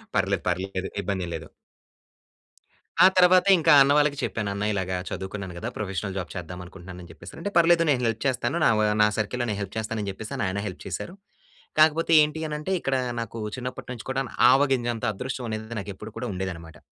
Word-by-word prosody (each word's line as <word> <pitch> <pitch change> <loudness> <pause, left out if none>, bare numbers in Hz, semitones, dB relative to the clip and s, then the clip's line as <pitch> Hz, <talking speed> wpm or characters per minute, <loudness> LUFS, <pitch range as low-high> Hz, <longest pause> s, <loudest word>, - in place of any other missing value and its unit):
పర్లేదు, - - +1
పర్లేదు. 95 +1 -2
ఇబ్బం‌దేం 95 -2 -3
లేదు. 80 -1 -7 1.6
ఆ! - - +10
తర్వాత 185 0 +6
ఇంకా 165 -1 +4
అన్న 140 +1 +5
వాళ్ళకి 145 -1 +2
చెప్పాను. 105 -3 -2
"అన్న 100 +1 -2
ఇలాగ 95 -2 -2 0.2
చదువుకున్నాను 95 -1 -6
గదా! 115 - -4
ప్రొఫెషనల్ 95 -1 -3
జాబ్ 90 - -5
చేద్దాం 90 0 -7
అనుకుంటున్నాను." 90 0 -11
అని 85 - -12
జెప్పేసి 85 +2 -12
అని - - -10
అంటే. 205 - -2
పర్లేదు 170 0 +5
నేను 130 -3 +1
హెల్ప్ 115 -1 -1
చేస్తాను 125 +2 0
నా‌వ 110 - +4 0.2
నా 105 - +6
సర్కిల్‌లో 120 +3 -1
నేను 100 - -2
హెల్ప్ 100 0 -7
చేస్తాను. 110 0 -3
అని 100 - -4
జెప్పే‌స‌ని 105 +2 -5
ఆయన 100 +2 -2
హెల్ప్ 90 - -9
చేసారు. 175 - -5 0.7
కాకపోతే 160 +2 +4
ఏంటి 150 +1 -1
అనంటే 150 +4 -3
ఇక్కడ 135 0 0 0.2
నాకు 115 0 -6 0.2
చిన్నప్పటినుంచి 125 -1 -7
కూడా‌ను, 135 -1 -2 0.2
ఆవగింజంత 130 -4 +2
అదృష్టం 125 +3 -5
అనేది 110 +1 -5
నాకు 100 +1 -6
ఎప్పుడు 110 +2 -9
కూడా 125 +1 -4
ఉండేది 95 +1 -3
అన్నమాట. 80 -1 -12
110 Hz, 185 wpm, -25 LUFS, 95-135 Hz, 1.6 s, ఆ